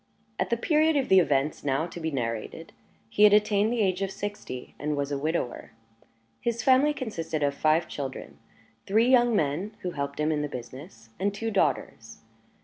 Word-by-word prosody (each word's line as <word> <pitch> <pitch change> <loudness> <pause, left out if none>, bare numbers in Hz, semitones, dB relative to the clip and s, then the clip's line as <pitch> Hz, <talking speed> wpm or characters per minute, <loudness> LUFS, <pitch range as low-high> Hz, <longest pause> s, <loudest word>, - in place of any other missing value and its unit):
At - - 0
the 235 - +1
period 310 +4 +2
of 270 - 0
the 190 - +7
events 145 -3 0
now 140 +2 0
to 175 0 -8
be 160 -1 -2
narrated, 115 -6 -4 0.3
he 115 - -3
had 210 -1 +8
attained 210 +1 +3
the 240 -2 0
age 185 -1 0
of 195 - -1
sixty, 195 -10 -6
and 150 0 -2
was 140 0 -2
a 140 - -1
widower. 155 -4 -3 0.7
His 235 -1 -2
family 270 +3 +5
consisted 165 - -4
of 140 0 +1
five 155 +3 +2
children 135 -2 -7 0.5
three 220 +4 +3
young 240 -3 +4
men, 175 +6 -1
who 180 - -2
helped 140 -2 -4
him 150 +1 +1
in 150 -1 0
the 150 - -3
business, 125 -1 -10
and 200 +2 +1
two 225 +3 -4
daughters. 200 - -1
175 Hz, 185 wpm, -27 LUFS, 145-215 Hz, 0.7 s, had